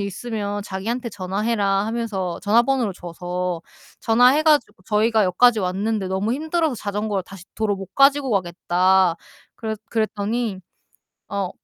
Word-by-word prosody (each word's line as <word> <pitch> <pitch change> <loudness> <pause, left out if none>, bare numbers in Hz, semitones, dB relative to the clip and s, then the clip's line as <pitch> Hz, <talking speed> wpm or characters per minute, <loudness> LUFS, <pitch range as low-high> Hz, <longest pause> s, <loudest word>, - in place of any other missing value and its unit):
있으면 205 -1 -4
자기한테 230 +6 -3
전화해라 200 0 0
하면서 215 -6 -3
전화번호를 235 +1 +2
줘서 175 0 -4 0.4
전화해 250 +6 +4
가지고 285 -11 +2
"저희가 220 +1 +2
여기까지 220 +5 +4
왔는데 195 +2 -1
너무 195 +5 -1
힘들어서 315 +1 0
자전거를 205 -2 -2
다시 185 -1 -12
도로 210 -2 0
못 195 -1 -10
가지고 275 -1 +4
가겠다." 185 -1 +2 0.4
그랬 220 -2 -4
그랬더니 220 -1 -1 0.7
어 200 -3 -2
210 Hz, 335 characters per minute, -22 LUFS, 190-235 Hz, 0.7 s, 전화해